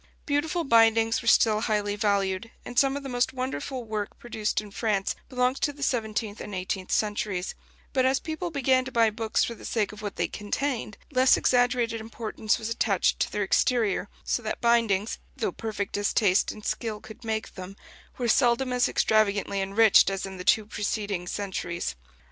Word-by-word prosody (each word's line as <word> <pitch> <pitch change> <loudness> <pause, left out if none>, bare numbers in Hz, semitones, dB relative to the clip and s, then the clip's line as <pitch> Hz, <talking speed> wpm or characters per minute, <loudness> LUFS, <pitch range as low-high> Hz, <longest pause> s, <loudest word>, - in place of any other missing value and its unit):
Beautiful 305 +4 0
bindings 225 -3 +4
were 230 - -8
still 215 -1 +4
highly 210 -2 0
valued, 200 0 0 0.2
and 245 - 0
some 275 0 +2
of 285 - -7
the - - -5
most 245 0 0
wonderful 260 0 -4
work 215 -2 -4
produced 220 -3 -2
in 210 -1 -8
France 200 -1 0 0.2
belongs 250 0 +1
to 290 - +1
the 285 0 -8
seventeenth 220 -4 -2
and 210 - -6
eighteenth 185 0 -3
centuries; 205 -3 -1 0.4
but 260 - +3
as 265 +1 +3
people 320 +2 -4
began 265 -4 +2
to 260 - -7
buy 230 -2 +3
books 220 0 0
for 235 - -2
the 230 - -14
sake 215 -4 -1
of 210 0 -11
what 205 -2 -5
they - - 0
contained, 220 +1 -3
less 260 -1 +5
exaggerated 245 -2 +2
importance 220 0 -2
was 220 -2 -5
attached 220 -5 +1
to - - 0
their 205 - -1
exterior, 210 -1 +1
so - - -1
that 215 - -4
bindings, 230 -3 +2 0.2
though - - -1
perfect 215 -3 -4
as 205 0 -1
taste 195 -4 +3
and 215 - -11
skill 215 0 -2
could 220 +2 -13
make 220 -1 -3
them, 185 +1 -8 0.4
were 245 - -1
seldom 250 +2 +3
as 250 0 +2
extravagantly 200 -2 +2
enriched 200 +1 +5
as 195 0 -3
in 190 -1 -8
the 180 - -6
two 215 +3 +3
preceding 205 -3 -3
centuries. 180 - -3
220 Hz, 185 wpm, -27 LUFS, 205-245 Hz, 0.4 s, less